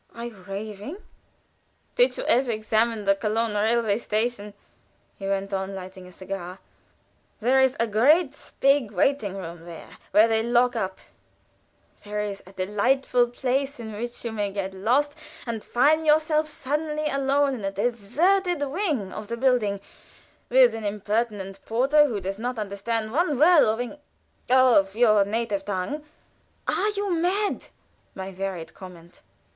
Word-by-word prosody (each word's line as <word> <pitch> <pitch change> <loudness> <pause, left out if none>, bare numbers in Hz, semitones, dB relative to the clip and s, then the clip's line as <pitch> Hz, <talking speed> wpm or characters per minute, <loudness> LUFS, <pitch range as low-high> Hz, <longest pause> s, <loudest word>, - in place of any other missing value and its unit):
"Are 235 0 -6
you 235 -3 -8
raving?" 210 - -6 1.0
"Did - - +3
you - - -3
ever 255 - +2
examine 220 0 0
the 195 - +5
Cologne 215 +2 -1
railway 220 0 +1
station?" 215 -2 -2 0.6
he 195 - -6
went 195 0 -2
on, 190 0 -3
lighting 185 0 -9
a - - -13
cigar. 185 -1 -7 0.8
"There 250 +4 +3
is 265 +1 +3
a 230 - +3
great 280 - +2
big 275 -4 +3
waiting 205 0 0
room, 170 -3 -8
which 175 +5 0
they 220 -1 +1
lock 240 +1 +2
up; 190 -4 -2 1.1
there 210 0 -3
is 200 -1 -5
a 190 - -14
delightful 240 +6 +1
place 270 +3 -2
in 220 -2 -7
which 240 +3 -6
you 230 - -2
may 205 -2 -2
get 195 -1 -4
lost, 255 +10 +1 0.3
and 230 -3 -4
find 300 +6 +3
yourself 310 0 +3
suddenly 300 +1 -3
alone 275 0 +1
in 235 -5 -6
a 195 - 0
deserted 285 - +1
wing 285 - -2
of 215 - -7
the 235 +1 -4
building, 235 -6 +2 0.7
with 250 -2 +6
an 225 -1 -6
impertinent 205 -1 -2
porter, 275 +6 +3
who 225 -6 -3
doesn't 215 +6 -4
understand 215 +2 -3
one 300 +1 +1
word 320 +3 +6
of 225 - -4
Eng 245 +4 -5 0.5
of 245 -7 +4
your 215 -3 +5
native 210 -1 -2
tongue 205 +10 -3 0.3
" - - -40
"Are 420 - +1
you 400 -2 0
mad?" 380 +5 +1
was - - -19 0.5
my 190 0 -6
varied 190 -3 -5
comment. 175 -2 -13
230 Hz, 150 wpm, -25 LUFS, 200-270 Hz, 1.1 s, with